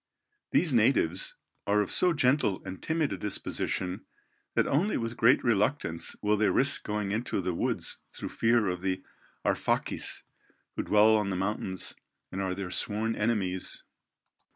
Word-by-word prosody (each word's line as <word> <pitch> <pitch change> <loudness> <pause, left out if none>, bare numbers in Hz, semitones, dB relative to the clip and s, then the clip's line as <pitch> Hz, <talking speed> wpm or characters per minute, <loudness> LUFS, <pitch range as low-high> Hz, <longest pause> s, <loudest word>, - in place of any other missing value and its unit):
These 160 -6 +2
natives, 105 -7 +2 0.3
are 105 +1 +3
of 100 - -2
so 180 - +4
gentle 135 - +2
and 95 - -7
timid 160 -6 0
a - - -4
disposition, 95 -1 -3 0.5
that - - +3
only 180 +10 +1
with 115 +1 -3
great 120 +4 +4
reluctance 105 - 0
will 105 0 +3
they 105 0 +3
risk 140 +2 +4
going 105 -2 -2
into 110 0 -1
the 90 -1 -1
woods - - -2
through - - -6
fear 115 -2 +2
of 90 -1 -2
the 95 0 -2 0.4
Arfakis, - - 0 0.5
who - - -1
dwell 105 +1 +5
on 105 -2 +1
the 95 - -1
mountains, 95 -1 -3 0.4
and 95 - -3
are 95 -1 -1
their 95 -2 -5
sworn 110 +4 +1
enemies. 100 -4 -1
105 Hz, 150 wpm, -29 LUFS, 95-120 Hz, 0.5 s, dwell